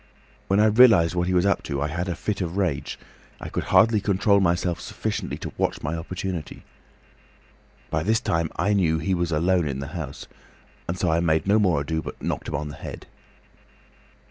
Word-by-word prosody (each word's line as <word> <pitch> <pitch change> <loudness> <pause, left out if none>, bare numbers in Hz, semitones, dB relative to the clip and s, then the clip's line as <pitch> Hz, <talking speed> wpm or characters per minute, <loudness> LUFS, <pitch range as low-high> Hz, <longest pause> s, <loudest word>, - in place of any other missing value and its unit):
When 95 +1 +2
I 105 - +5
realised 110 -7 +6
what 90 0 0
he 95 - 0
was 90 - +3
up 100 - +2
to 70 -2 -3
I 75 - 0
had 85 +4 -3
a 90 - -2
fit 105 +4 -3
of 90 +1 -3
rage—I 85 -9 -5
could - - -3
hardly 110 -2 +4
control 100 0 +3
myself 85 -2 0
sufficiently - - -4
to - - -7
watch - - -1
my 80 +3 -2
opportunity. 90 -1 -5 1.3
By 75 - 0
this 110 +6 +2
time 80 -5 -1
I 105 - +1
knew 85 -5 +2
he 80 +5 -1
was 85 -1 -1
alone 85 +1 +2
in 70 -2 -3
the 70 +1 -5
house, 80 -7 -6 0.6
and 85 - -3
so 90 -2 +1
I 80 - +2
made 80 -2 +1
no 100 +3 +4
more 90 -8 +2
ado, 80 +2 -2
but - - -8
knocked - - -3
him - - -3
on 75 +1 -3
the 75 - -9
head." - - -8
85 Hz, 195 wpm, -24 LUFS, 80-95 Hz, 1.3 s, realised